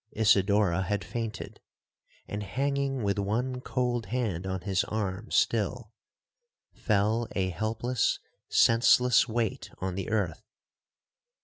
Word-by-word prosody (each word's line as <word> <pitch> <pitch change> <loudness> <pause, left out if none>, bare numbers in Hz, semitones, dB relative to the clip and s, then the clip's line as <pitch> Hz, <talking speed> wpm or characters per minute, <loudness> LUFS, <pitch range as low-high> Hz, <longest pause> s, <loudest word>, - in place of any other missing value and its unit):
Isidora 100 -3 +3
had 100 +1 -2
fainted; 110 0 -5 0.7
and 105 - -4
hanging 135 +4 -1
with 100 0 0
one 125 +6 -1
cold 125 -3 -1
hand 105 -8 -2
on 95 -1 -3
his 95 0 0
arm 105 0 -3
still, 115 +1 0 0.8
fell 110 +2 +1
a 95 -2 0
helpless, 110 +6 0 0.3
senseless 120 +2 +5
weight 115 -2 -2
on 95 0 -3
the 95 0 -4
earth. 100 -8 -1
110 Hz, 110 wpm, -28 LUFS, 95-120 Hz, 0.8 s, senseless